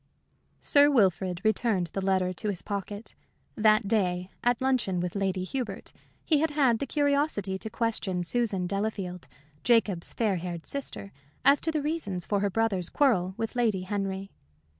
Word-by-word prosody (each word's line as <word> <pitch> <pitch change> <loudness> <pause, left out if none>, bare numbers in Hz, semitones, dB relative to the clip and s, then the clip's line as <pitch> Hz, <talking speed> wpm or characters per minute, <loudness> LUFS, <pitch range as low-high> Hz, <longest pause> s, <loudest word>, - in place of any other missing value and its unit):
Sir 290 -1 +5
Wilfrid 185 - +2
returned 215 -6 +1
the 195 - -2
letter 190 -1 +1
to 210 +4 -3
his 190 -4 -2
pocket. 205 +1 -5 0.4
That 215 -1 +3
day, 185 -4 0
at 245 -1 +2
luncheon 255 -9 +1
with 175 0 -2
Lady 190 -2 -1
Hubert, 250 +6 -5 0.3
he 305 -3 +3
had 320 +2 +2
had 270 -6 +2
the 280 - -3
curiosity 285 -10 0
to 220 - -6
question 215 -5 -1
Susan 200 -2 0
Delafield, 195 -2 -3 0.4
Jacob's 215 -7 +2
fair 210 -5 0
haired 170 -1 -6
sister, 270 -7 -4 0.3
as 280 +1 +6
to 325 - +1
the 305 -2 -1
reasons 225 - -3
for 205 - 0
her 200 0 +1
brother's 195 -4 0
quarrel 190 -11 +2
with 225 +2 -3
Lady 225 -6 +1
Henry. 195 0 -3
205 Hz, 160 wpm, -28 LUFS, 185-245 Hz, 0.4 s, as